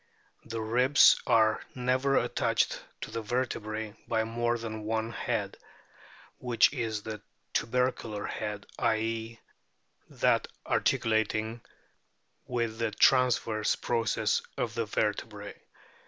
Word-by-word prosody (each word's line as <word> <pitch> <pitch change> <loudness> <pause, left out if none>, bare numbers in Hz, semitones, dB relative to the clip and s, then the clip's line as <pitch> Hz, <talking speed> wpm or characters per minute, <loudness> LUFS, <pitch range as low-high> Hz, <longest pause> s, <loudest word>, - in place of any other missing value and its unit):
The 115 -1 -4
ribs 125 +6 +5
are 110 -3 +4
never 130 +2 +1
attached - - +1 0.2
to - - -6
the 115 - -3
vertebrae 110 -2 -3
by 110 -1 +1
more 120 +1 0
than 110 -1 -5
one 110 +1 -2
head, - - -2 0.8
which 125 +1 +3
is 110 -5 -2
the 110 -2 -6 0.3
tubercular 120 -3 -1
head, 105 -1 -4
i.e., 115 +1 -1 0.7
that - - +2 0.2
articulating 110 +1 +1 0.9
with 115 -3 -2
the 115 -1 +1
transverse 115 -1 +3
process 115 -3 0 0.2
of 115 - -2
the 115 -1 -2
vertebrae. 105 0 -3
115 Hz, 105 wpm, -29 LUFS, 110-120 Hz, 0.9 s, ribs